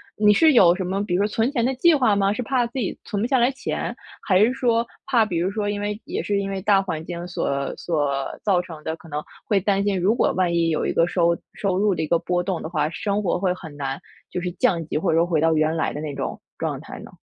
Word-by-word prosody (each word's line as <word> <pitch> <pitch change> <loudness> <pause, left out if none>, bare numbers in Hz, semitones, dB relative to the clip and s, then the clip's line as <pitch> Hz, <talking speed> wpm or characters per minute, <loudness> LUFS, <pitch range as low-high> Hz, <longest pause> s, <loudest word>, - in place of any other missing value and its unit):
你 210 0 +5
是 310 +8 +5
有 180 -8 +7
什 190 - -3
么， 190 +2 -1
比 175 - -3
如 180 - +2
说 205 - +2
存 225 +4 0
钱 245 -5 0
的 260 +2 +1
计 335 +6 +5
划 250 -8 +3
吗？ 200 0 +2
是 250 - -3
怕 250 0 +1
自 240 +3 -5
己 205 - -2
存 205 - -3
不 230 - +1
下 265 0 +2
来 240 +2 +3
钱， 275 - -4 0.2
还 185 -2 +2
是 215 +4 +5
说 235 -2 +1 0.2
怕 235 -4 +3
比 180 -6 -2
如 180 +3 0
说， 205 0 -2
因 205 0 -2
为 210 +1 -3
也 - - -3
是 205 -1 0
因 195 0 -3
为 195 - -3
大 200 -1 +4
环 160 -4 -4
境 175 0 -6
所 140 -5 -2
所 145 -5 -1
造 195 -4 +2
成 160 -4 -10
的， 160 - -3
可 165 - -16
能 150 0 -3 0.2
会 205 -3 +2
担 195 +1 +1
心， 200 -2 0
如 200 +6 +2
果 - - +2
万 185 -2 +1
一 165 -1 +2
有 155 - 0
一 - - 0
个 165 - +3
收 170 -1 +1 0.2
收 195 -3 -1
入 205 0 +2
的 160 - -2
一 160 - -2
个 170 - +3
波 175 +1 -1
动 180 -2 -3
的 - - -3
话， 155 -3 0
生 200 +6 -2
活 180 -3 0
会 185 -1 +1
很 160 -5 -10
难， 135 -1 -4 0.3
就 180 - -3
是 180 - -2
降 180 -5 +1
级， - - -2
或 155 - +1
者 160 - +2
说 170 - +2
回 165 -3 +1
到 160 +1 +3
原 155 +1 +2
来 160 - -1
的 150 - -5
那 150 -2 -5
种 - - -4 0.2
状 - - -3
态 - - -9
呢？ - - -11
190 Hz, 305 characters per minute, -23 LUFS, 165-210 Hz, 0.3 s, 有